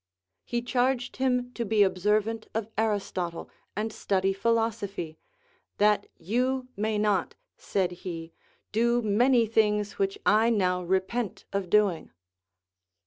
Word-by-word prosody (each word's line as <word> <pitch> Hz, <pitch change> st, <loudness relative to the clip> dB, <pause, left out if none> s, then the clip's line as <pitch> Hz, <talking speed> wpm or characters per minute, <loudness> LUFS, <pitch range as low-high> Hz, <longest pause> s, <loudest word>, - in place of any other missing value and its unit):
He 240 Hz, 0 st, -2 dB
charged 250 Hz, 0 st, 0 dB
him 250 Hz, -1 st, +1 dB
to 235 Hz, -, -2 dB
be 215 Hz, -1 st, +4 dB
observant 210 Hz, +4 st, 0 dB
of 225 Hz, -1 st, -2 dB
Aristotle, 195 Hz, -6 st, -2 dB, 0.2 s
and 215 Hz, +2 st, -2 dB
study 195 Hz, -1 st, 0 dB
philosophy. 205 Hz, -6 st, -1 dB, 0.6 s
That 210 Hz, 0 st, +3 dB
you 250 Hz, +8 st, -1 dB
may 215 Hz, +1 st, -1 dB
not, 210 Hz, -3 st, +1 dB, 0.2 s
said 190 Hz, -3 st, -1 dB
he, 165 Hz, -2 st, -6 dB, 0.4 s
do 235 Hz, +2 st, +2 dB
many 235 Hz, +3 st, +4 dB
things 210 Hz, -1 st, +1 dB
which 195 Hz, 0 st, 0 dB
I 220 Hz, +2 st, +5 dB
now 180 Hz, -5 st, +1 dB
repent 190 Hz, +4 st, -1 dB
of 195 Hz, -2 st, -2 dB
doing. 200 Hz, -4 st, +2 dB
210 Hz, 120 wpm, -27 LUFS, 195-230 Hz, 0.6 s, I